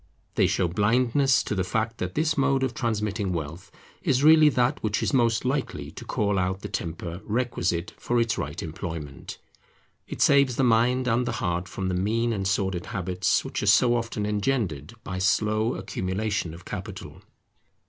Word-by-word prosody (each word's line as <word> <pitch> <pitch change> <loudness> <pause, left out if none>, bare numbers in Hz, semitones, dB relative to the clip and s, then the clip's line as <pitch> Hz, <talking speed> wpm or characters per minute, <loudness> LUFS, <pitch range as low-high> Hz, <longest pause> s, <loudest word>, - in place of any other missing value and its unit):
They - - +3
show 90 - +1
blindness 120 - +2
to - - -3
the 95 -2 0
fact 110 +5 -2
that 90 0 -4
this 155 0 +1
mode 135 -1 +2
of 130 -2 -1
transmitting 105 -4 -1
wealth 80 +1 -5 0.3
is 130 +1 +1
really 155 0 +7
that 125 -3 +1
which 105 -2 -1
is - - 0
most 115 -3 +2
likely 135 +1 -2
to - - -9
call 100 -2 0
out 95 +1 -1
the - - -5
temper 85 +2 -5
requisite 100 -7 -1
for 120 0 0
its 115 -1 +1
right - - -4
employment. 80 -5 -6 0.7
It - - -7
saves 140 -3 +4
the 135 - +1
mind 125 +2 +3
and 120 +1 +1
the - - -1
heart 90 0 -2
from 95 -1 -4
the 95 - -1
mean 115 +6 0
and 95 -3 -2
sordid 95 -3 -1
habits 90 0 0
which - - -3
are - - -2
so 120 -1 +5
often 115 -3 -2
engendered 105 - -1
by 95 -1 -4
slow 110 +4 +1
accumulation 95 -1 -2
of 85 - -14
capital. 100 0 -7
105 Hz, 175 wpm, -26 LUFS, 90-120 Hz, 0.7 s, really